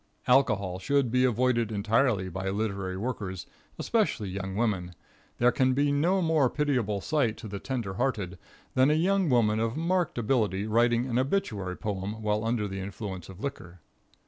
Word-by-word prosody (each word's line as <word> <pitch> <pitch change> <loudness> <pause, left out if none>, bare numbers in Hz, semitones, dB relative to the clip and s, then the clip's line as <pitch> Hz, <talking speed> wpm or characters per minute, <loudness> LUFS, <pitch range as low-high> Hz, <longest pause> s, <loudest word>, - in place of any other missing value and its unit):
Alcohol 105 -8 +2
should 135 +4 +1
be 125 +1 +3
avoided 120 -2 +1
entirely 105 -1 +1
by 95 +2 -4
literary 100 -2 -2
workers, 100 -5 -4 0.3
especially 205 - 0
young 95 0 -4
women. 95 -6 -1 0.4
There 120 +1 +4
can 130 0 +2
be 145 +1 +2
no 175 +7 +2
more 155 -5 +3
pitiable 125 -10 0
sight 130 -6 0
to - - -8
the 100 -1 -5
tender 120 -5 -3
hearted, 100 -6 -2 0.3
than 130 +2 +4
a 150 - +3
young 185 +2 +2
woman 110 -4 +3
of 115 +4 -1
marked 175 -1 0
ability 105 -5 +1
writing 120 +2 +2
an 125 -1 0
obituary 110 - -1
poem 105 0 -4
while 105 0 0
under 115 -2 0
the 95 0 -5
influence 95 -2 -6
of 95 +1 -11
liquor. 90 -10 -6
115 Hz, 165 wpm, -28 LUFS, 100-130 Hz, 0.4 s, There